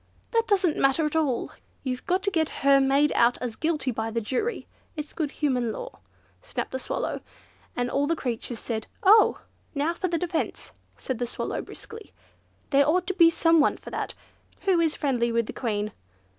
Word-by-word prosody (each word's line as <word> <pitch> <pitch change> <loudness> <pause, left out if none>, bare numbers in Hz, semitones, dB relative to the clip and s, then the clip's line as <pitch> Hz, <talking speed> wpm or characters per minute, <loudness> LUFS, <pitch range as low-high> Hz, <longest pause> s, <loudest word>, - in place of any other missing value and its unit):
"That 460 -1 +2
doesn't 375 -6 +2
matter 275 +4 +3
at 300 - -2
all, 285 -7 0 0.3
you've 255 -2 -4
got 370 +2 +1
to 400 - +1
get 320 -4 +1 0.2
her 275 0 +7
made 275 +2 +3
out 235 +1 +3
as 240 -3 -4
guilty 310 -4 0
by 225 -1 -2
the 230 +1 -1
jury. 260 - -2 0.3
It's 300 -1 -6
good 310 -3 -1
human 255 -6 0
law," - - -7 0.4
snapped - - -4
the 260 - -3
Swallow, - - -3 0.5
and 245 0 0
all 280 +3 0
the 330 - +1
creatures 240 -3 -3
said 220 -1 -4 0.2
"Oh!" 425 +3 +6 0.3
"Now 295 +4 +1
for 370 +2 -2
the 340 -1 0
defence," 335 -1 -3 0.3
said 255 -3 -4
the 245 - -1
Swallow - - -3
briskly; 445 -1 -11 0.6
"there 280 0 +5
ought 360 +3 +2
to 380 - -1
be 335 -3 +7
someone 330 -2 +3
for - - -11
that. - - -3 0.5
Who 380 -3 +3
is 325 -2 +2
friendly 245 -5 0
with 230 0 +1
the - - -7
Queen?" 210 -3 -2
290 Hz, 185 wpm, -26 LUFS, 245-335 Hz, 0.6 s, her